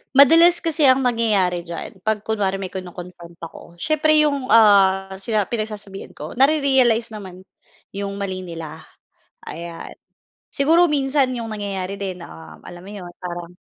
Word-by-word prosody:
Madalas 330 Hz, +5 st, +6 dB
kasi 315 Hz, -3 st, +2 dB
ang 260 Hz, +1 st, +4 dB
nangyayari 205 Hz, -8 st, 0 dB
diyan 170 Hz, +3 st, -8 dB
'pag 215 Hz, +2 st, -2 dB
kunwari 205 Hz, -3 st, -1 dB
may 195 Hz, -1 st, -6 dB
kino-confront 180 Hz, -2 st, -9 dB
ako, 165 Hz, +1 st, -11 dB
siyempre 310 Hz, -, +1 dB
yung, 280 Hz, -3 st, -1 dB
ah, 195 Hz, -4 st, +5 dB
sina 215 Hz, +1 st, 0 dB
pinagsasabihan 210 Hz, -3 st, -6 dB
ko, -, -, -8 dB
nare-realize 265 Hz, -4 st, +2 dB
naman 190 Hz, -4 st, -10 dB, 0.5 s
yung 200 Hz, 0 st, -5 dB
mali 195 Hz, -2 st, -4 dB
nila, 165 Hz, -3 st, -9 dB, 0.6 s
ayan. 170 Hz, +1 st, -8 dB, 0.6 s
Siguro 330 Hz, +5 st, +3 dB
minsan 270 Hz, -3 st, +1 dB
yung 230 Hz, -2 st, -5 dB
nangyayari 200 Hz, -2 st, -4 dB
din, 185 Hz, -3 st, -5 dB
uhm, 160 Hz, -1 st, -13 dB
alam 175 Hz, 0 st, -11 dB
mo 195 Hz, -, -11 dB
'yon, 180 Hz, -3 st, -9 dB
parang 175 Hz, -1 st, -7 dB
200 Hz, 140 wpm, -21 LUFS, 180-255 Hz, 0.6 s, Madalas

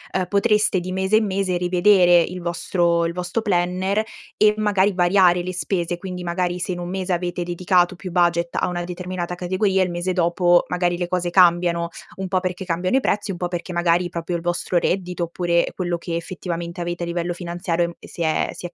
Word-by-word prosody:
uhm, 185 Hz, -1 st, +1 dB
potreste, 210 Hz, 0 st, +2 dB
di 180 Hz, +1 st, -5 dB
mese 190 Hz, +3 st, +2 dB
in 220 Hz, -1 st, +1 dB
mese, 190 Hz, -1 st, -1 dB
rivedere 180 Hz, 0 st, +4 dB
il 180 Hz, +2 st, -2 dB
vostro 170 Hz, 0 st, 0 dB
il 165 Hz, -, -2 dB
vostro 180 Hz, +5 st, -3 dB
planner 190 Hz, +1 st, 0 dB, 0.3 s
e, 210 Hz, 0 st, +4 dB
magari, 205 Hz, -2 st, +2 dB
variare 180 Hz, -1 st, +4 dB
le 185 Hz, +1 st, -4 dB
spese. 175 Hz, -1 st, -2 dB
Quindi, 180 Hz, -1 st, -6 dB
magari, 175 Hz, 0 st, -1 dB
se 180 Hz, -, -3 dB
in 175 Hz, -, -4 dB
un 175 Hz, 0 st, -5 dB
mese 190 Hz, 0 st, -2 dB
avete 175 Hz, 0 st, -2 dB
dedicato 175 Hz, +1 st, +1 dB
più 185 Hz, +1 st, -7 dB
budget 170 Hz, -1 st, +1 dB
a -, -, 0 dB
una 175 Hz, 0 st, -3 dB
determinata 180 Hz, 0 st, -5 dB
categoria, 190 Hz, +2 st, +1 dB
il 185 Hz, -, -2 dB
mese 175 Hz, +2 st, -2 dB
dopo, 175 Hz, 0 st, +3 dB
magari, 175 Hz, -1 st, 0 dB
le 175 Hz, 0 st, -3 dB
cose 180 Hz, -1 st, -1 dB
cambiano, 175 Hz, -1 st, +3 dB, 0.3 s
un 190 Hz, 0 st, -4 dB
po' 185 Hz, 0 st, +2 dB
perché 185 Hz, 0 st, -4 dB
cambiano 185 Hz, +4 st, -1 dB
i 270 Hz, -, +3 dB
prezzi, 205 Hz, -4 st, -1 dB
un 180 Hz, -, -5 dB
po' 175 Hz, 0 st, -3 dB
perché, 175 Hz, +1 st, -5 dB
magari, 175 Hz, +1 st, +2 dB
proprio 170 Hz, 0 st, -4 dB
il -, -, -7 dB
vostro 175 Hz, +1 st, -1 dB
reddito 180 Hz, 0 st, -1 dB
oppure, 170 Hz, 0 st, +1 dB
ehm, -, -, -8 dB
quello 175 Hz, -2 st, -2 dB
che, 170 Hz, 0 st, -5 dB
effettivamente, 170 Hz, 0 st, -5 dB
avete 175 Hz, 0 st, -3 dB
a -, -, -1 dB
livello 170 Hz, 0 st, -2 dB
finanziario 175 Hz, -1 st, -2 dB
e -, -, -2 dB
m -, -, -7 dB
e -, -, -13 dB
si -, -, -9 dB
è 160 Hz, -1 st, +1 dB
si -, -, -9 dB
è 175 Hz, -, -19 dB
175 Hz, 220 wpm, -22 LUFS, 175-185 Hz, 0.3 s, rivedere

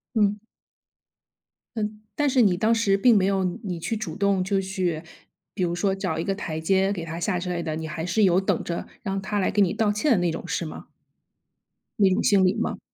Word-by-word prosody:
嗯。 210 Hz, -1 st, +2 dB, 1.4 s
嗯， 210 Hz, -1 st, -3 dB, 0.2 s
但 290 Hz, -1 st, +2 dB
是 260 Hz, -1 st, +3 dB
你 190 Hz, -5 st, +3 dB
当 220 Hz, +4 st, +2 dB
时 220 Hz, -4 st, +2 dB
并 230 Hz, +3 st, +5 dB
没 190 Hz, -2 st, +3 dB
有 195 Hz, -1 st, +1 dB
你 180 Hz, -1 st, -3 dB
你 180 Hz, -4 st, -4 dB
去 225 Hz, +7 st, -2 dB
主 190 Hz, -7 st, -5 dB
动， 200 Hz, -2 st, +2 dB
就 195 Hz, +1 st, 0 dB
去 185 Hz, -4 st, -2 dB, 0.5 s
比 185 Hz, -, -2 dB
如 170 Hz, -, +1 dB
说 190 Hz, +2 st, 0 dB
找 185 Hz, -5 st, -2 dB
一 165 Hz, -, -2 dB
个 195 Hz, -, 0 dB
台 165 Hz, -6 st, -4 dB
阶 190 Hz, +4 st, +2 dB
给 175 Hz, -5 st, -4 dB
她 165 Hz, +1 st, -6 dB
下 180 Hz, 0 st, 0 dB
之 180 Hz, +1 st, -4 dB
类 175 Hz, -1 st, -2 dB
的， 155 Hz, -1 st, -3 dB
你 160 Hz, 0 st, -4 dB
还 160 Hz, +1 st, -5 dB
是 190 Hz, +5 st, +2 dB
有 185 Hz, 0 st, +4 dB
等 190 Hz, -, -1 dB
着 170 Hz, -, -4 dB
让 195 Hz, 0 st, -3 dB
她 205 Hz, +2 st, -2 dB
来 190 Hz, -, +1 dB
给 205 Hz, -, +3 dB
你 185 Hz, -, +2 dB
道 215 Hz, -1 st, +1 dB
歉 220 Hz, +9 st, 0 dB
的 230 Hz, -, +5 dB
那 175 Hz, -1 st, +1 dB
种， 165 Hz, -, -6 dB
是 170 Hz, -, -1 dB
吗？ 155 Hz, -, -9 dB, 1.1 s
那 195 Hz, -2 st, +6 dB
种 185 Hz, -, +1 dB
心 200 Hz, -5 st, +4 dB
理 185 Hz, +1 st, +3 dB
吗？ 225 Hz, -, -2 dB
195 Hz, 250 characters per minute, -25 LUFS, 175-205 Hz, 1.4 s, 那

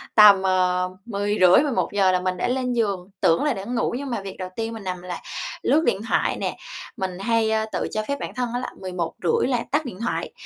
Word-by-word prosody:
tầm, 205 Hz, -3 st, +9 dB
ờ, 185 Hz, -1 st, +2 dB, 0.2 s
10:30-11:00 205 Hz, 0 st, +3 dB
là 185 Hz, -, +2 dB
mình 185 Hz, 0 st, -2 dB
đã -, -, 0 dB
lên 250 Hz, 0 st, 0 dB
giường, 200 Hz, -5 st, -1 dB
tưởng 165 Hz, -, +3 dB
là 295 Hz, -, +2 dB
đã 195 Hz, -, -6 dB
ngủ 240 Hz, 0 st, -1 dB
nhưng 275 Hz, 0 st, -5 dB
mà 230 Hz, -4 st, -2 dB
việc 195 Hz, -1 st, -7 dB
đầu 185 Hz, -1 st, -5 dB
tiên 225 Hz, 0 st, -3 dB
mình 220 Hz, -3 st, -8 dB
nằm 180 Hz, -1 st, -4 dB
là 180 Hz, -1 st, -6 dB, 0.4 s
lướt 315 Hz, +2 st, +3 dB
điện 195 Hz, -, +1 dB
thoại -, -, +1 dB
nè, -, -, -3 dB, 0.4 s
mình 190 Hz, -3 st, -3 dB
hay, 225 Hz, +1 st, +1 dB
ơ, 220 Hz, 0 st, +1 dB
tự -, -, -2 dB
cho 215 Hz, 0 st, -1 dB
phép 280 Hz, 0 st, -2 dB
bản -, -, -5 dB
thân 250 Hz, -2 st, -1 dB
á 245 Hz, -, 0 dB
là -, -, -4 dB
11:30 180 Hz, -1 st, -1 dB
là 245 Hz, -3 st, 0 dB
tắt 295 Hz, 0 st, +1 dB
điện 220 Hz, -5 st, -7 dB
thoại 235 Hz, -, -2 dB
205 Hz, 225 wpm, -23 LUFS, 185-240 Hz, 0.4 s, tầm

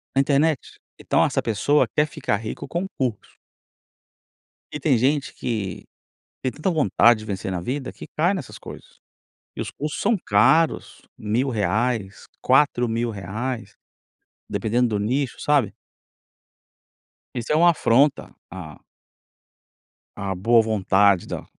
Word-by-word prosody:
na 135 Hz, -, +5 dB
internet. 145 Hz, +1 st, 0 dB, 0.2 s
Então -, -, +2 dB
essa -, -, 0 dB
pessoa 120 Hz, +7 st, +2 dB
quer 150 Hz, 0 st, +2 dB
ficar 145 Hz, -9 st, -2 dB
rico 110 Hz, 0 st, -6 dB
com 175 Hz, +3 st, -2 dB
curso. 125 Hz, -6 st, -3 dB, 1.4 s
E 150 Hz, -, -5 dB
tem 135 Hz, -3 st, +2 dB
gente 140 Hz, +4 st, 0 dB
que 105 Hz, -7 st, -4 dB, 0.6 s
tem 130 Hz, -, -1 dB
tanta 155 Hz, +8 st, -2 dB
vontade 120 Hz, -, +4 dB
de 110 Hz, -, -9 dB
vencer 95 Hz, -2 st, -4 dB
na 90 Hz, -2 st, -3 dB
vida 130 Hz, +7 st, -4 dB
que -, -, -11 dB
cai 175 Hz, +5 st, +3 dB
nessas 145 Hz, -10 st, -6 dB
coisas -, -, -12 dB, 0.6 s
e -, -, -4 dB
os -, -, -5 dB
custos 150 Hz, +1 st, -5 dB
são 230 Hz, +3 st, +2 dB
caros, 165 Hz, -2 st, +2 dB, 0.2 s
R$1000, 110 Hz, -2 st, -1 dB, 0.2 s
R$4000, 120 Hz, -3 st, 0 dB, 0.7 s
dependendo 115 Hz, +4 st, 0 dB
do -, -, -3 dB
nicho, 125 Hz, +4 st, -1 dB
sabe? 140 Hz, -9 st, +1 dB, 1.6 s
Isso 120 Hz, -2 st, -4 dB
é 150 Hz, -, +3 dB
uma 170 Hz, +2 st, +6 dB
afronta 140 Hz, -1 st, +2 dB, 0.2 s
à 85 Hz, -5 st, -9 dB, 1.4 s
À 100 Hz, -1 st, -3 dB
boa 115 Hz, +5 st, +4 dB
vontade 100 Hz, -3 st, +2 dB
da -, -, -6 dB
120 Hz, 125 wpm, -23 LUFS, 105-145 Hz, 1.6 s, uma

